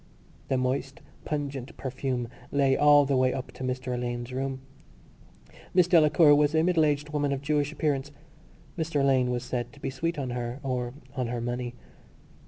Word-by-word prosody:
The 130 - +1
moist 130 +2 -2 0.3
pungent 140 -3 -4
perfume 130 -2 -3 0.2
lay 135 -1 +3
all 145 0 +6
the 140 0 +1
way 130 0 +3
up 130 - -5
to - - -9
Mr 130 0 -2
Alleyne's 120 0 -3
room. 135 0 -3 1.1
Miss 180 -2 +5
Delacour 155 -3 +6
was 150 +1 +3
a 160 - +4
middle 170 -3 +3
aged 150 0 0
woman 145 -1 0
of 140 0 -2
Jewish 145 0 +1
appearance. 145 -3 -1 0.7
Mr 160 -2 0
Alleyne 130 -2 +3
was 125 0 -2
said 125 -1 -3
to 145 - -15
be 135 - -3
sweet 165 +5 -2
on 130 -3 -3
her 120 +1 -4
or 125 -2 -2 0.2
on 125 -2 -1
her 120 0 -3
money. 120 +1 -3
135 Hz, 175 wpm, -27 LUFS, 125-145 Hz, 1.1 s, all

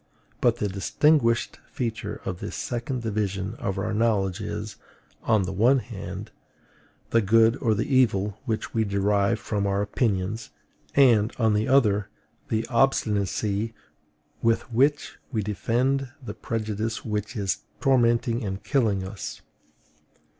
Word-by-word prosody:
But 120 -2 +3
the 105 - -1
distinguishing 115 +5 +2
feature 115 -4 -4
of 90 -2 -4
this - - -5
second 120 +1 -3
division 100 -2 -2
of 95 0 -2
our 110 +2 -2
knowledge 105 -4 +1
is, - - -5 0.4
on 110 -3 +2
the 95 - -3
one 120 +8 +4
hand, 115 -6 -6 0.8
the 115 - +4
good 115 +3 +4
or 110 -4 +1
the 110 - -1
evil 105 -6 +2
which 110 -2 -3
we 115 - +2
derive 100 +1 +1
from 105 -1 -1
our 100 +1 +1
opinions; 105 0 -1 0.5
and, 120 -6 +5
on 110 -3 +3
the 105 +1 +1
other, 105 -7 +3 0.4
the 110 0 0
obstinacy 110 -3 +1 0.7
with 115 0 +2
which 140 +5 +2
we 110 -5 -1
defend 125 +6 0
the 120 -7 -7
prejudice 110 0 -3
which 105 +1 -3
is 100 -3 -1 0.2
tormenting 120 -2 +2
and 95 -1 -4
killing 110 -9 +1
us. 100 +2 -7
110 Hz, 130 wpm, -25 LUFS, 100-120 Hz, 0.8 s, and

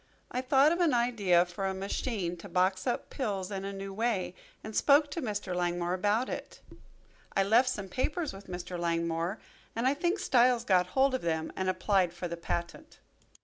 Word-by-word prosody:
I 250 - -1
thought 270 +3 +4
of 340 - 0
an 320 -7 +3
idea 205 -8 +3
for 180 +2 -4
a 190 - -2
machine 195 -1 -2
to 185 +4 -10
box 185 +3 +1
up 245 - -2
pills 205 -7 -3
in 195 -1 -4
a 200 - -3
new 195 0 -6
way, 195 -5 -1 0.3
and 215 -1 -7
spoke 290 0 +4
to 335 - -3
Mr. 205 -6 -3
Langmore 175 0 0
about 205 +6 +1
it. - - -6 0.8
I 195 - +5
left 230 +6 +4
some 205 -6 -4
papers 300 - -2
with 195 +1 -11
Mr. 180 0 -5
Langmore 170 +2 -1 0.4
and 230 +2 -1
I 265 - +4
think 345 +6 0
Styles 245 - +3
got 180 -2 +3
hold 270 0 +4
of 260 - -1
them 160 -1 -2
and 190 0 -1
applied 185 -1 +1
for 175 +1 -5
the 170 - -4
patent. 170 - -5
195 Hz, 190 wpm, -30 LUFS, 180-250 Hz, 0.8 s, I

